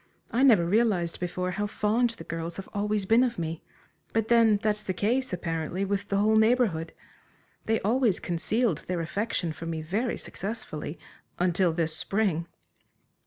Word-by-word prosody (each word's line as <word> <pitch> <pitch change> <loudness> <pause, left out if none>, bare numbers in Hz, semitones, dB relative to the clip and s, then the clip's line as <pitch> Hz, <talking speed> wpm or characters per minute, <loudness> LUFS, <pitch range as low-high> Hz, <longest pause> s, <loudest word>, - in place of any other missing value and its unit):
I 240 - +1
never 225 -11 +6
realized 190 -3 +1
before 180 +1 -2
how 205 +3 -2
fond 220 +4 +1
the - - -8
girls 165 +1 -5
have 195 - -7
always 210 0 0
been 225 +5 +5
of 240 -3 -1
me. 165 -1 -3 0.5
But 225 0 0
then 230 -3 +5
that's 210 0 0
the 185 -3 -3
case, 250 +7 0
apparently 170 +1 -2
with 200 0 -2
the 200 - 0
whole 215 +2 +4
Neighborhood. 220 -8 +2 0.8
They 225 0 +2
always 225 -2 +2
concealed 195 - 0
their 180 -2 -1
affection 175 -1 -2
for 165 - -7
me 160 -1 -3
very 210 +10 -1
successfully 175 -7 -5 0.4
until 180 0 +2
this 160 -1 -1
spring!" 190 -5 0
200 Hz, 160 wpm, -27 LUFS, 170-220 Hz, 0.8 s, never